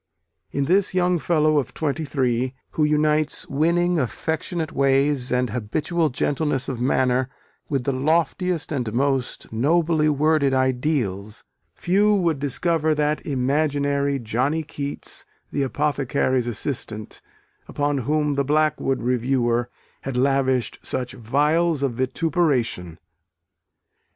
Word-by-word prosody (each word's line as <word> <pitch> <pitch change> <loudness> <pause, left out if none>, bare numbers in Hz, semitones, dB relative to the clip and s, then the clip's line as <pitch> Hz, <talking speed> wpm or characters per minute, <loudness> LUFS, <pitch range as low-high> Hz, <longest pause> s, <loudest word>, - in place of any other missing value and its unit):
In 140 - -1
this 185 +4 +2
young 180 -1 +2
fellow 155 -2 +2
of 130 - -5
twenty 155 0 -2
three, 130 -2 0 0.2
who 155 - 0
unites 150 0 +2
winning, 170 +4 +1
affectionate 160 - -2
ways, 135 -1 +2
and 125 -2 +1
habitual 150 +9 -1
gentleness 140 0 0
of 125 -3 -4
manner, 130 0 +1 0.4
with 135 -3 0
the 140 - 0
loftiest 160 +5 0
and 125 -7 -2
most 135 -2 -1
nobly 155 +5 +2
worded 150 -2 +2
ideals, 125 -6 -1 0.3
few 205 +4 +3
would 170 -7 +1
discover 155 +3 +1
that 150 0 0
imaginary 140 0 +1
"Johnny 130 +7 -1
Keats, 145 -2 -6 0.2
the 145 - -1
apothecary's 135 -2 0
assistant," 110 -2 -4 0.5
upon 145 -1 -1
whom 150 +3 0
the 140 0 +1
Blackwood 145 -3 +1
reviewer 120 -1 +1 0.3
had 135 -2 -4
lavished 130 -1 +1
such 125 -1 -4
vials 150 +6 +1
of 135 -3 0
vituperation. 130 - 0
140 Hz, 115 wpm, -23 LUFS, 130-155 Hz, 0.5 s, few